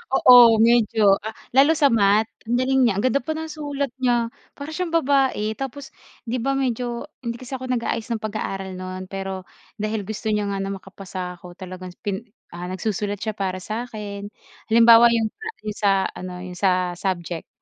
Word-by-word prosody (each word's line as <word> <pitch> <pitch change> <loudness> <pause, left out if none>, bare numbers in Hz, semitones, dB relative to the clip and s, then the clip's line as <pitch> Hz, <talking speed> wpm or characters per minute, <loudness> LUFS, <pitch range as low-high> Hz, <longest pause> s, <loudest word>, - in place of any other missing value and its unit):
Oo 240 -4 +8
medyo 220 -4 +4
ah, 220 - -4 0.2
lalo 280 +4 +6
sa 295 -3 +4
Math 215 -2 +3 0.2
ang 235 +2 -1
galing 265 +1 +2
niya, 235 -5 +4
ang - - -1
ganda 255 0 +2
pa 315 - -3
ng 320 +1 -4
sulat 285 -2 -3
niya 240 -3 +1 0.3
para 300 +2 -6
siyang 360 -3 -2
babae. 270 -8 +2
Tapos 270 +1 -6 0.4
di 240 - -1
ba 260 +3 0
medyo 245 -1 -2 0.2
hindi 235 0 -4
kasi 260 +1 -6
ako 255 0 -5
nag-aayos 235 -1 -2
ng 225 - -1
pag-aaral 195 -3 -4
nun 185 0 -6
pero 190 -1 -5 0.3
dahil 215 -1 -2
gusto 220 +2 -5
niya 210 -1 0
nga 195 - -2
na 195 - -2
makapasa 185 -2 -8
ako 175 -1 -12
talagang 185 -1 -9
pin 205 +3 -3 0.2
ah, 175 +1 -6
nagsusulat 205 +2 -3
siya 220 - -1
para 190 -2 -3
sakin. 215 -3 -5 0.4
Halimbawa 230 +1 +8
yung 220 -2 0
sa 445 +1 -10 0.2
yung 210 -1 -5
sa 200 -2 +3 0.2
ano, 185 0 -7
yung 180 -1 -8
sa 185 -2 +2
subject 175 -3 -3
220 Hz, 180 wpm, -23 LUFS, 195-250 Hz, 0.4 s, Oo